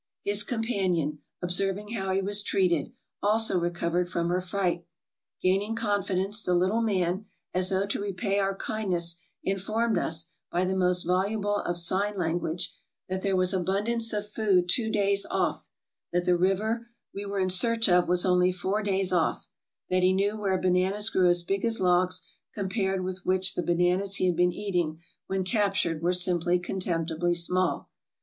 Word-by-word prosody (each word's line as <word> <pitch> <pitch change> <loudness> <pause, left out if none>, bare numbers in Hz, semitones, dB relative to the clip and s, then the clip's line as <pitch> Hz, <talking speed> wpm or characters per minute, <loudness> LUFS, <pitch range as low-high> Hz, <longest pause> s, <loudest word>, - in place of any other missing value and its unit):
His 205 0 +3
companion, 190 - -1 0.2
observing 195 +4 0
how 195 -4 -2
he 195 +1 0
was 205 +1 +2
treated, 180 -4 0 0.3
also 215 -2 +4
recovered 175 0 -1
from 170 -1 -1
her 180 +1 0
fright. 180 -2 -1 0.6
Gaining 195 +4 +1
confi 205 -4 -1
dence, 195 +4 0
the 180 -2 0
little 190 +6 +2
man, 190 -2 -1 0.3
as 185 0 +2
though 195 0 +1
to 200 - -3
repay 200 0 -1
our 195 0 0
kindness, 180 -6 -2 0.3
informed 215 +4 0
us, 160 0 -1 0.3
by 180 +2 +1
the 190 +1 -1
most 180 -1 +1
voluble 205 +3 0
of 175 -3 -2
sign 195 +4 0
language, 170 0 -2 0.4
that 185 0 -2
there 195 -1 0
was 185 +1 +2
abundance 205 +6 +1
of 210 -1 -3
food 200 -4 +1
two 220 +5 +1
days 200 -1 +1
off; - - -1 0.4
that 175 0 0
the 180 - +3
river 210 +6 0 0.3
we 200 - -5
were 200 0 -4
in 185 -1 +1
search 230 +5 +4
of 180 -1 +4
was 180 +1 +3
only 180 0 +3
four 190 +3 -2
days 195 -2 0
off; 170 -3 0 0.4
that 185 0 +2
he 185 +1 +4
knew 200 +2 +1
where 195 -3 0
bananas 185 +3 +1
grew 185 -1 +3
as 175 0 +3
big 195 +2 -2
as 230 -1 +2
logs 180 0 +2 0.3
compared 195 -1 -1
with 185 0 -4
which 185 0 +2
the - - -1
bananas 180 +3 +1
he 185 - 0
had 180 -2 +2
been 180 +1 +3
eating 175 -5 -2 0.3
when 190 -1 -1
captured 190 -5 0
were 175 +1 +2
simply 180 -1 +2
contemptibly 175 -2 -1
small. 180 +1 0
185 Hz, 170 wpm, -27 LUFS, 180-205 Hz, 0.6 s, also